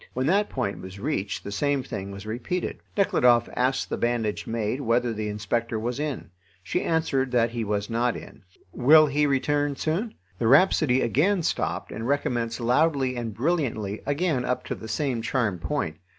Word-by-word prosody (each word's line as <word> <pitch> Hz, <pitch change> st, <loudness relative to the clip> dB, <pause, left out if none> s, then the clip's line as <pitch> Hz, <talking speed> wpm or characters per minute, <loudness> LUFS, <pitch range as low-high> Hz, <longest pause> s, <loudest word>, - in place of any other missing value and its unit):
When 130 Hz, +1 st, 0 dB
that 200 Hz, +7 st, +2 dB
point 125 Hz, -7 st, -3 dB
was 95 Hz, +1 st, -9 dB
reached 105 Hz, -5 st, -2 dB
the 100 Hz, -, -6 dB
same 140 Hz, +5 st, 0 dB
thing 100 Hz, -6 st, -5 dB
was 100 Hz, +1 st, -8 dB
repeated. 120 Hz, +11 st, -3 dB, 0.2 s
Nekhludoff 120 Hz, -, +4 dB
asked 130 Hz, +2 st, +1 dB
the -, -, -2 dB
bandaged 120 Hz, -3 st, -1 dB
maid 115 Hz, +3 st, -2 dB
whether 120 Hz, -1 st, +1 dB
the 105 Hz, -1 st, -3 dB
inspector 110 Hz, +3 st, -2 dB
was 120 Hz, +4 st, -3 dB
in. 145 Hz, -9 st, -4 dB, 0.3 s
She 180 Hz, -, -1 dB
answered 150 Hz, -5 st, 0 dB
that 120 Hz, -1 st, +3 dB
he 120 Hz, -1 st, -2 dB
was 105 Hz, -1 st, -1 dB
not 120 Hz, +1 st, 0 dB
in. -, -, -12 dB, 0.3 s
"Will 155 Hz, +8 st, +6 dB
he 150 Hz, +1 st, +1 dB
return 145 Hz, +1 st, +1 dB
soon?" 180 Hz, -, -2 dB, 0.2 s
The 115 Hz, -, +1 dB
rhapsody 140 Hz, -2 st, +5 dB
again 165 Hz, -, +2 dB
stopped -, -, -2 dB
and 110 Hz, +2 st, -4 dB
recommenced 120 Hz, -5 st, -1 dB
loudly 130 Hz, +1 st, +2 dB
and 120 Hz, -2 st, -3 dB
brilliantly 115 Hz, -, -1 dB
again 145 Hz, -2 st, +1 dB
up 125 Hz, -, -2 dB
to -, -, -3 dB
the 110 Hz, -, -8 dB
same 125 Hz, +1 st, -1 dB
charmed 110 Hz, -, -1 dB
point. 80 Hz, 0 st, -2 dB
125 Hz, 175 wpm, -26 LUFS, 110-145 Hz, 0.3 s, Will